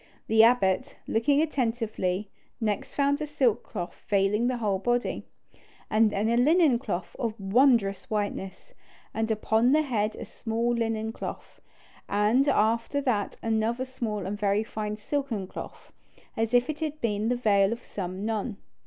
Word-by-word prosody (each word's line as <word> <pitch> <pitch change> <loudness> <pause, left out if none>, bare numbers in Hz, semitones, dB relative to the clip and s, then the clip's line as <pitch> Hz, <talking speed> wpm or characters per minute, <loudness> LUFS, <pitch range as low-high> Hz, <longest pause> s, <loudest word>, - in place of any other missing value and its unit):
The 220 0 +5
abbot, 235 +1 +3
looking 280 +7 +2
attentively, 225 - -1 0.3
next 210 -3 -2
found 285 +1 +2
a 305 - -2
silk 260 -6 +1
cloth 175 -4 -7
veiling 205 +3 +2
the 255 -1 0
whole 205 -4 0
body, 240 +4 -1 0.6
and 215 0 +4
then 210 +1 -1
a 235 +1 +2
linen 295 -1 +4
cloth 190 -8 -4
of 225 -3 -2
wondrous 215 +1 +3
whiteness, 205 -3 -4 0.4
and 220 0 -1
upon 220 +3 +2
the 310 +1 +4
head 220 -6 -1
a - - -7
small 230 +1 -2
linen 225 -1 -1
cloth, - - -8 0.5
and 215 +7 +3
after 230 +5 +1
that 230 -7 -1
another 225 +3 0
small 225 -6 -4
and 205 +2 -4
very 205 +1 +2
fine 215 -1 -4
silken 235 -3 -2
cloth, - - -10 0.4
as 225 +2 0
if 245 +1 +4
it 305 -1 -4
had 305 -1 -3
been 215 -2 0
the 245 - +2
veil 205 -4 +3
of 235 +1 -5
some 185 +1 -5
nun. 220 -1 -2
225 Hz, 155 wpm, -27 LUFS, 210-245 Hz, 0.6 s, The